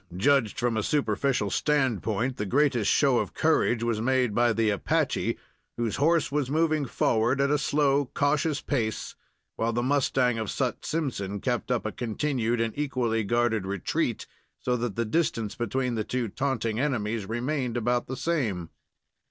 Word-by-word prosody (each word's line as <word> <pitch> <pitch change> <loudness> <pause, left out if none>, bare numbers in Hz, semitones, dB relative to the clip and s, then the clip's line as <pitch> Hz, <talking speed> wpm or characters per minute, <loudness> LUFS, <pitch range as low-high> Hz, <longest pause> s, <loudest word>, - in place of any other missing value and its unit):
Judged 130 +1 +2
from 120 -1 0
a - - +1
superficial 125 -3 0
standpoint, 125 -4 0
the 105 - -2
greatest 130 -3 +2
show 135 -4 +4
of - - -4
courage 155 -7 +2
was 115 -2 0
made 125 -2 +1
by 120 +1 +3
the 110 -1 +2
Apache, 100 - 0 0.4
whose 115 -2 -1
horse 160 +2 +2
was 145 -3 0
moving 155 -1 +1
forward 120 +3 +1
at 140 +1 +2
a 150 - +3
slow, 140 0 +2
cautious 150 +1 +1
pace, 115 -7 -2 0.4
while 115 +1 0
the 120 +1 -1
mustang 130 -3 +2
of 110 - -3
Sut 130 -3 -2
Simpson 115 -11 -2
kept 120 +3 -2
up 125 -3 0
a 110 - -1
continued 120 0 -1
and 115 -1 -1
equally 125 -6 0
guarded 115 -2 +1
retreat, 100 -2 -1 0.3
so 125 - -1
that 120 -4 -3
the 115 - 0
distance 115 -5 0
between 120 +2 -1
the 110 -2 -1
two 120 0 -2
taunting 115 -2 -1
enemies 115 -7 -1
remained 125 +1 -1
about 120 +1 0
the 130 - -5
same. 115 - -1
120 Hz, 160 wpm, -27 LUFS, 110-140 Hz, 0.4 s, show